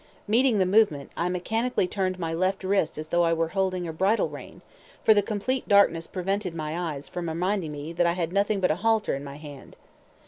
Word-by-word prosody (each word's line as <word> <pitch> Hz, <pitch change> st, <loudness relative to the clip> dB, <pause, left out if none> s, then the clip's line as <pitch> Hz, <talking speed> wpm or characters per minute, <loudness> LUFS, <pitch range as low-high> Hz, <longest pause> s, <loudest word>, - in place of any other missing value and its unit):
Meeting 235 Hz, +2 st, +3 dB
the 190 Hz, -, +3 dB
movement, 185 Hz, -8 st, +2 dB
I 175 Hz, -, -1 dB
mechanically 225 Hz, +4 st, -1 dB
turned 185 Hz, -1 st, -2 dB
my 165 Hz, -2 st, -3 dB
left 185 Hz, +3 st, 0 dB
wrist 190 Hz, -5 st, 0 dB
as 155 Hz, +1 st, -6 dB
though 175 Hz, -, +2 dB
I 165 Hz, -1 st, +3 dB
were 165 Hz, 0 st, 0 dB
holding 185 Hz, -1 st, -1 dB
a 160 Hz, -, -5 dB
bridle 195 Hz, +7 st, +1 dB
rein, -, -, -11 dB, 0.4 s
for 220 Hz, -, +7 dB
the 205 Hz, -, +3 dB
complete 215 Hz, +6 st, -2 dB
darkness 185 Hz, -5 st, +4 dB
prevented 190 Hz, -1 st, -3 dB
my 160 Hz, 0 st, -3 dB
eyes 140 Hz, +1 st, -8 dB
from 175 Hz, -2 st, -4 dB
reminding 180 Hz, 0 st, -1 dB
me 150 Hz, +2 st, -6 dB
that 170 Hz, +1 st, +2 dB
I 170 Hz, -, +2 dB
had 175 Hz, -1 st, -3 dB
nothing 200 Hz, +1 st, +1 dB
but 180 Hz, -4 st, +2 dB
a 155 Hz, -, -1 dB
halter 220 Hz, +1 st, +1 dB
in 140 Hz, -, -4 dB
my 140 Hz, -1 st, -8 dB
hand. 145 Hz, -2 st, -11 dB
180 Hz, 215 wpm, -26 LUFS, 165-200 Hz, 0.4 s, for